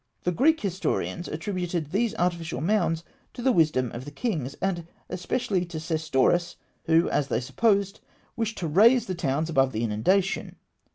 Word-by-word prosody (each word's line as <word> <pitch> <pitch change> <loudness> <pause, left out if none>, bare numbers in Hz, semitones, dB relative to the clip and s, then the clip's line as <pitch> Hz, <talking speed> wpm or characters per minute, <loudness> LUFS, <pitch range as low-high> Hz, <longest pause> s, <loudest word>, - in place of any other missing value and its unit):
The 180 - +1
Greek 310 - +3
historians 185 -2 -2
attributed 175 -2 -3
these 225 +3 0
artificial 170 - -1
mounds 170 -1 +1 0.3
to 240 - -6
the 260 - +4
wisdom 150 - +2
of 120 - -6
the 145 - -7
kings, 145 - -3
and 175 -4 -2 0.2
especially 190 0 -1
to 170 -2 -6
Sesostris, 160 +1 +1 0.3
who, 165 +1 +4
as 140 - +1
they 115 - 0
supposed, 195 - +1 0.4
wished 225 -1 -2
to 170 - -2
raise 225 +9 +5
the 185 - -3
towns 155 -2 -1
above 135 -5 +2
the 110 +2 -1
inundation. 180 - 0
175 Hz, 160 wpm, -26 LUFS, 155-200 Hz, 0.4 s, raise